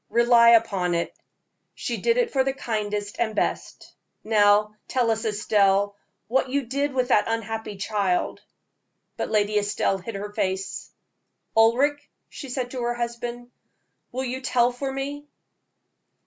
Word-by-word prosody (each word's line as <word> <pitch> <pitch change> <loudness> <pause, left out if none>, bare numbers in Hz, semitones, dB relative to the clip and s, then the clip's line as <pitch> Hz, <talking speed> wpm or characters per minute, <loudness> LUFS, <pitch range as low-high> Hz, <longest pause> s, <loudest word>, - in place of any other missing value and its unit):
Rely 235 0 +5
upon 200 -7 +3
it, 170 - -2 0.6
she - - -3
did 470 0 +1
it 485 -2 +1
for 265 -1 +3
the 270 0 -1
kindest 210 -4 -3
and 220 -2 0
best. - - -3 0.3
Now, 210 -1 +4
tell 245 -3 +1
us, 225 +1 -2
Estelle, 205 -1 +2 0.3
what 260 +3 +1
you 280 +2 0
did 280 +4 -1
with 255 -1 0
this 210 - +5
unhappy 225 -2 -3
child." 195 -2 -1 0.7
But - - -3
Lady 210 0 +2
Estelle 205 -1 0
hid 200 +4 -7
her 205 +1 -5
face. 190 -1 -3 0.7
"Ulric," 265 +6 +3 0.2
she 275 - -9
said 250 -1 -3
to 255 - -4
her 240 0 -1
husband, 240 0 -5 0.6
"will 260 +2 -3
you 260 +1 -4
tell 245 -2 +2
for 270 +2 -4
me?" 285 +2 -5
230 Hz, 145 wpm, -24 LUFS, 205-255 Hz, 0.7 s, Rely